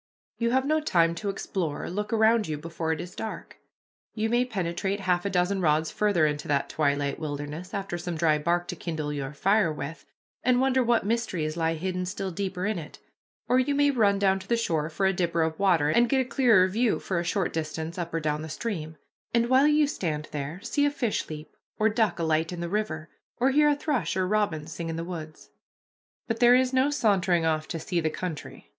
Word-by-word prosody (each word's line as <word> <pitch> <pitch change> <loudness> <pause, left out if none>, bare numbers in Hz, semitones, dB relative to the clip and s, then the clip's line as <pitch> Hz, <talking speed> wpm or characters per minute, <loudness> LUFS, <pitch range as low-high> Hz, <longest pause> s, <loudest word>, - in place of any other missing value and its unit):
You 235 0 +1
have 260 +2 +2
no 310 +2 +2
time 170 - +2
to 200 +4 -4
explore 185 -5 -3
or - - -4
look 210 +3 -3
around 220 0 +3
you 155 -1 -3
before 160 +1 -3
it 160 - -1
is 175 - -7
dark. 220 - -7 0.6
You 220 0 0
may 240 +1 +3
penetrate 195 -2 -2
half 180 -1 +1
a - - +1
dozen 190 +1 +1
rods 155 -1 +2
farther 205 -7 +2
into 150 0 -2
that 140 -1 0
twilight 145 -1 0
wilderness 150 +3 -5
after 190 -3 -4
some 175 0 -4
dry 155 -2 +2
bark 175 +3 0
to - - -3
kindle 155 -3 -4
your 140 -1 -4
fire 195 +3 +2
with, 140 -1 -7 0.4
and 250 0 +3
wonder 260 0 +3
what 235 -3 +2
mysteries 185 -9 -1
lie 165 -1 0
hidden 180 +2 -3
still 190 0 -4
deeper 185 0 -3
in 210 -3 -1
it, 155 - -10 0.5
or 250 - +4
you 280 +2 +1
may 285 0 +4
run 210 -6 +3
down 195 -1 +2
to 190 - -12
the 235 - +2
shore 160 -9 -1
for 180 +4 -1
a 190 - +3
dipper 170 -2 +1
of 160 0 -2
water, 175 -7 +3
and 235 +8 +3
get 270 - +3
a - - -2
clearer 235 -8 +4
view 220 +4 +1
for 185 -3 -2
a - - -1
short 180 +1 -1
distance 160 +2 -4
up 170 -1 -4
or 165 - -1
down 150 -1 -1
the 160 - -6
stream, 160 -5 -4 0.4
and 235 0 +2
while 265 +3 +5
you 300 0 +4
stand 160 - -3
there, 150 +3 -4
see 285 - 0
a 290 - +4
fish 245 -6 -2
leap, 150 -1 -8 0.2
or 215 +1 +3
duck 220 0 +1
alight 160 0 0
in 175 - -5
the 170 - -3
river, 170 -6 -2 0.3
or 260 +2 +3
hear 295 +2 +5
a 295 - +3
thrush 255 - -1
or 185 -1 +1
robin 200 -7 0
sing 165 +1 -6
in 165 - -3
the 165 - -3
woods. 160 -3 -8 0.8
But 225 -1 -2
there 245 0 +7
is 255 0 +2
no 260 +2 +3
sauntering 190 - +2
off 155 -1 0
to 165 - -4
see 175 +2 -1
the 160 -1 0
country. 165 -1 -6
180 Hz, 225 wpm, -27 LUFS, 160-220 Hz, 0.8 s, there